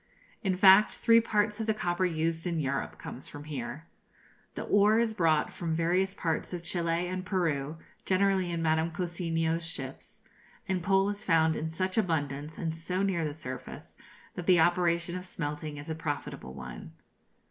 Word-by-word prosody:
In 190 -4 +1
fact, 195 +2 +7
three 230 0 +5
parts 210 -1 0
of 220 - -2
the 220 - +2
copper 175 -2 0
used 165 0 -1
in 170 -2 -1
Europe 140 -2 -2
comes 130 - -7
from 145 - -9
here. 155 +1 -6 0.7
The - - -3
ore 205 +2 +4
is 230 -1 +2
brought 160 -6 +2
from 165 -2 -2
various 180 +4 +1
parts 165 +2 -2
of 175 -1 -4
Chili 170 0 -1
and 185 0 -3
Peru, 160 -6 -1 0.3
generally 190 -1 +2
in 170 -1 -2
Madame 160 +1 +2
Cousiño's 165 -1 -1
ships; 135 -5 -7 0.4
and 190 -1 0
coal 195 +2 +3
is 205 0 -7
found 160 -2 +3
in 160 - -3
such 185 +5 -1
abundance, 150 -5 -2
and 160 -1 -2
so 180 +4 -2
near 185 -4 +1
the 150 - -1
surface, 130 -4 -8 0.4
that 180 - -6
the 180 -2 +6
operation 175 0 +2
of 180 - -4
smelting 150 -2 -4
is 145 - -7
a 160 - -2
profitable 145 - -5
one. 65 -2 -8
170 Hz, 170 wpm, -30 LUFS, 160-185 Hz, 0.7 s, fact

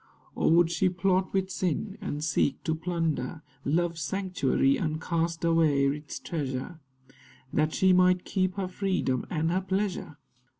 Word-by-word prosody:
Or - - +2
would 170 0 +5
she 175 +2 +2
plot 185 +1 +1
with 190 -1 -1
sin, 185 +3 -2
and 150 -7 -4
seek 145 -3 0
to 160 - 0
plunder 160 -3 -2 0.2
Love's 165 +2 0
sanctuary, 150 -6 +1
and 155 -1 -2
cast 165 0 -1
away 160 -4 +3
its 145 +2 -2
treasure, 145 +1 -4 0.7
That 155 +1 +1
she 190 -1 +4
might 180 0 +4
keep 185 -1 0
her 195 -2 -2
freedom 185 - -1
and 160 0 0
her 185 +2 +1
pleasure? 190 -5 -2
170 Hz, 145 wpm, -28 LUFS, 155-185 Hz, 0.7 s, would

